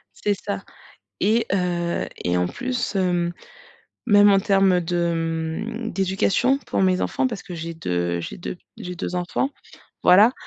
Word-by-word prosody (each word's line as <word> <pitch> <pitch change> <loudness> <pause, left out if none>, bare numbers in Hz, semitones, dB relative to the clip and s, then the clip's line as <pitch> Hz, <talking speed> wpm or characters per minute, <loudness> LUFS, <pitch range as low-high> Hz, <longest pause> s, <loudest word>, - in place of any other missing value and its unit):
C'est 205 - 0
ça, 100 - -5 0.6
et 220 +4 +2
heu, 175 -2 0 0.2
et 90 0 +1
en 90 0 +2
plus, 250 - -3
hem, 175 -2 +1 0.7
même 205 -2 +7
en 195 -1 +5
termes 195 -2 +3
de, 170 0 0
mmh, 165 +8 -3
d'éducation 195 +7 +2
pour 235 - -2
mes 185 -1 +3
enfants 260 - 0
parce 225 -5 -4
que 180 - -8
j'ai 165 0 -5
2 85 - -1
j'ai - - -6
2 180 - -5
p - - -36
j'ai 180 0 -6
2 180 - -4
enfants. 180 +10 -1 0.5
Voilà, 205 +7 +7
180 Hz, 160 wpm, -23 LUFS, 170-205 Hz, 0.7 s, même